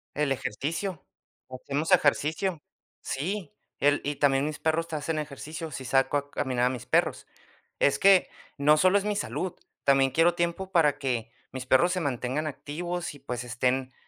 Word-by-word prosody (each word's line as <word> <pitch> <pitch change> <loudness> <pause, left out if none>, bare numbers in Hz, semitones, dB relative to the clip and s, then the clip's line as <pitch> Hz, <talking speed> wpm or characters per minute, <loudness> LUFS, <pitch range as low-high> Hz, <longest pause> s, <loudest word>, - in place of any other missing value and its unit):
El 145 -2 0
ejercicio. 155 - -3 0.4
Hacemos 140 +6 -3
ejercicio. 160 +1 +2 0.4
Sí. 175 +4 -4 0.3
El 145 0 +3
y 145 0 -2
también 135 0 +2
mis 150 -1 -3
perros 165 +1 0
hacen 155 +1 -2
ejercicio, 155 +2 -6
si 130 -2 -7
saco 135 +3 +2
a 145 0 -5
caminar 125 -2 0
a - - +3
mis 125 -3 -6
perros. - - +1 0.5
Es 140 - +3
que 195 -1 +5 0.3
no 150 +2 +5
solo 185 +5 +4
es 200 - -4
mi 210 -1 -1
salud, 185 -3 -3 0.3
también 135 -1 +4
quiero 165 +5 +3
tiempo 175 +2 -2
para 150 -5 +3
que, 120 -5 -2 0.2
mis 130 -1 -6
perros 170 +8 +4
se 185 - -1
mantengan 135 +1 -2
activos 170 +3 -4
y 145 - -14
pues 125 -1 -4
estén 130 +1 -1
145 Hz, 165 wpm, -27 LUFS, 135-170 Hz, 0.5 s, que